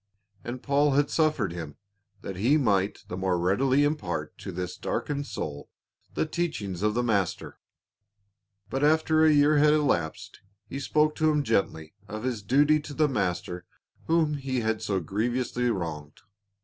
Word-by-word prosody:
And 120 +1 -6
Paul 145 0 +2
had 145 +1 +2
suffered 150 - +1
him, 80 -4 -7 0.5
that 95 - -5
he 120 +11 +3
might 100 -7 +1
the 90 - -5
more 95 -1 0
readily 130 +11 +2
impart 85 - -2
to 95 - -6
this 90 0 -4
darkened 145 -1 -3
soul 70 -1 -6 0.5
the - - +1
teachings 115 - -3
of 105 +1 +1
the 120 - +1
Master. 100 -7 -1 1.1
But 135 +6 -2
after 155 +1 +3
a 160 - +6
year 145 0 +4
had 150 +1 +5
elapsed 130 - -1 0.3
he 135 - -5
spoke 150 +1 +2
to 155 0 +3
him 150 -1 +1
gently 80 - -1
of 110 +3 -6
his 125 -4 -2
duty 145 +8 +3
to 145 -1 -9
the 155 -1 +3
master 90 -7 -2 0.4
whom 160 -2 +2
he 130 -3 -2
had 110 -1 -1
so 100 -3 -1
grievously 120 +6 -1
wronged. 80 -7 -4
120 Hz, 160 wpm, -27 LUFS, 95-145 Hz, 1.1 s, a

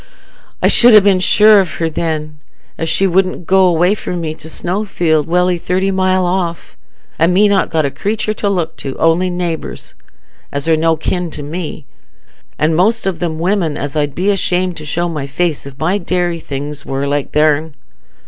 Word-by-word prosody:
I - - +5
should 235 -3 +7
ha' - - -3
been 195 -2 +3
sure 210 +3 +6
of 190 -3 -1
her 165 - -1
then, 155 -2 -3 0.4
as 165 - -3
she 195 - +2
wouldn't 185 -1 0
go 190 +1 +4
away 175 +2 +3
from 180 -4 -4
me 160 -2 -3
to 160 0 -12
Snowfield, 175 -4 -1
welly 180 +1 +1
thirty 185 +3 0
mile 185 -1 +1
off, 175 -2 -3 0.4
and 165 +2 +3
me 200 +4 +4
not 200 -1 +1
got 155 -2 0
a 140 - -1
creatur 215 +4 -2
to 205 -1 -2
look 180 -5 -2
to, 135 -1 -5
only 165 +3 +2
neighbours, 175 -3 -5 0.6
as 140 +2 -3
are 165 - +4
no 165 +1 +2
kin 175 +2 -2
to 150 -2 -7
me, 155 -1 -6 0.7
an' 155 +1 +1
most 215 +7 +1
of 185 -4 -2
'em 165 -3 -2
women 170 -3 0
as 145 +1 -5
I'd 145 -2 -1
be 195 +3 +1
ashamed 185 -2 0
to 155 - -8
show 175 +3 -1
my 150 -5 -4
face, 155 0 -2
if 135 -1 -12
my 175 +7 0
dairy 175 -2 -1
things 145 -1 -6
war 135 +1 -3
like 145 0 -2
their'n. 150 0 +1
170 Hz, 190 wpm, -15 LUFS, 155-185 Hz, 0.7 s, should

